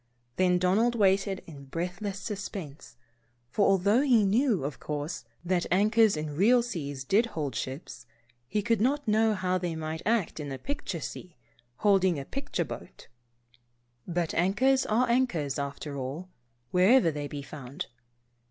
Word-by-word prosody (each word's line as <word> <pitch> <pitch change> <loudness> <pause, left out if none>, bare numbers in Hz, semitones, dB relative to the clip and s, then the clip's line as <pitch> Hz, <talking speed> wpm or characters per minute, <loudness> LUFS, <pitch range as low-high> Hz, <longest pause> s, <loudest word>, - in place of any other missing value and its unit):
Then 180 -1 +3
Donald 205 +7 +2
waited 195 -2 +2
in 140 -4 -11
breathless 180 +7 -4
suspense, 195 - -6 0.6
for 205 - +3
although 200 +5 +4
he 245 -7 +4
knew, 215 - +2
of 140 +1 -4
course, 150 +2 -4 0.2
that 175 -1 +1
anchors 215 +1 +4
in 150 -1 -4
real 235 +8 +5
seas 145 - -5
did 210 - +3
hold 150 - -3
real - - -1
ships, 130 -2 -8 0.4
he 210 +10 -1
could 230 -1 +1
not 285 +4 +1
know 220 0 +3
how 185 -1 0
they 175 -2 -3
might 160 0 -4
act 220 -7 0
in 145 -2 -5
a 135 - -4
picture 235 - -4
sea, 175 +3 -7 0.2
and - - -32 0.2
holding 190 -5 +4
a 135 - -5
picture 275 - -3
boat. - - -10 1.0
But 170 -2 -1
anchors 250 +10 +2
are 235 +4 +2
anchors, 180 - +1
after 140 +1 -5
all, 140 +7 -5 0.4
wherever 185 +1 +5
they 145 -1 -4
be 145 0 -6
found. 140 +4 -7
185 Hz, 155 wpm, -28 LUFS, 150-215 Hz, 1.0 s, real